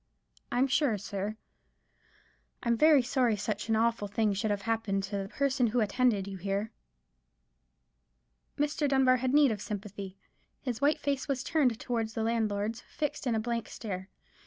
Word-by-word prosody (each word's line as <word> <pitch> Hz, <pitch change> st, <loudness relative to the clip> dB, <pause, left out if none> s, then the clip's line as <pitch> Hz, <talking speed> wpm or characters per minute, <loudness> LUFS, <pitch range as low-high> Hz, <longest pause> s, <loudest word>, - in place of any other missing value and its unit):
I'm 250 Hz, +2 st, +3 dB
sure, 275 Hz, -4 st, +2 dB
sir, 200 Hz, +2 st, -4 dB, 1.3 s
I'm 235 Hz, -1 st, +2 dB
very 300 Hz, +1 st, +6 dB
sorry 245 Hz, -2 st, +2 dB
such 210 Hz, +1 st, -3 dB
an 225 Hz, -, +3 dB
awful 230 Hz, -1 st, +1 dB
thing 210 Hz, 0 st, +1 dB
should 200 Hz, +3 st, -1 dB
have 205 Hz, -1 st, -1 dB
happened 215 Hz, -3 st, 0 dB
to 195 Hz, -, -6 dB
the—the 195 Hz, 0 st, -4 dB
person 270 Hz, -2 st, +1 dB
who 235 Hz, +3 st, +1 dB
attended 215 Hz, -2 st, +2 dB
you 195 Hz, -1 st, -6 dB
here." 200 Hz, +4 st, -2 dB, 1.9 s
Mr. 295 Hz, 0 st, +1 dB
Dunbar 265 Hz, -2 st, +4 dB
had 255 Hz, 0 st, 0 dB
need 290 Hz, -2 st, +5 dB
of 210 Hz, -2 st, -3 dB
sympathy. 200 Hz, -2 st, -6 dB, 0.5 s
His 250 Hz, -2 st, -3 dB
white 290 Hz, +2 st, +3 dB
face 280 Hz, -1 st, -1 dB
was 265 Hz, -2 st, -1 dB
turned 260 Hz, -8 st, +2 dB
towards 225 Hz, -3 st, -2 dB
the 225 Hz, -, -1 dB
landlord's, 220 Hz, 0 st, -1 dB
fixed 300 Hz, -2 st, -4 dB
in 235 Hz, -, +2 dB
a -, -, +1 dB
blank 235 Hz, 0 st, -2 dB
stare. 190 Hz, -4 st, -6 dB
225 Hz, 160 wpm, -30 LUFS, 205-260 Hz, 1.9 s, very